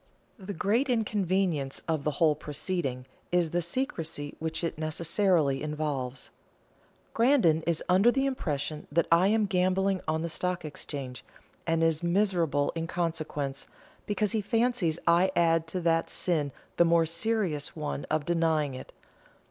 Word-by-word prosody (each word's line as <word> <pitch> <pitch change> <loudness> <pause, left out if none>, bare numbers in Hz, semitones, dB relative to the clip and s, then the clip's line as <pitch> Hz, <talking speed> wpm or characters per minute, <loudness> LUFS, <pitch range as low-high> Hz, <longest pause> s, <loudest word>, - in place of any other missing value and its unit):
The 195 +1 -6
great 225 - +1
inconvenience 190 - 0
of 160 -3 -1
the 150 - +1
whole 160 -3 +4
proceeding 145 -3 -3 0.3
is 175 -3 +2
the 175 - +1
secrecy 165 - -3
which 160 +1 -3
it 165 -2 -3
necessarily 160 -2 +1
involves. 145 -4 -3 0.8
Grandon 230 - +4
is 170 -2 +1
under 190 +6 +5
the 270 +2 +1
impression 155 - -3
that 170 +3 +2
I 170 +3 +5
am 215 +1 +3
gambling 190 0 +1
on 160 +1 0
the - - -1
Stock 180 +1 -2
Exchange, 140 -4 -6 0.4
and 165 0 +2
is 165 -1 +2
miserable 170 -5 +1
in 165 0 -3
consequence, 155 -5 -3 0.4
because 205 0 0
he 220 - 0
fancies 225 -6 +1
I 170 +3 +4
add 165 -1 +3
to 180 +3 -2
that 165 -1 +1
sin 155 -6 0 0.3
the - - +6
more 165 0 +4
serious 170 -3 -1
one 150 -2 -4
of 155 -1 -1
denying 160 -4 +1
it. 130 - -9
165 Hz, 145 wpm, -28 LUFS, 155-190 Hz, 0.8 s, the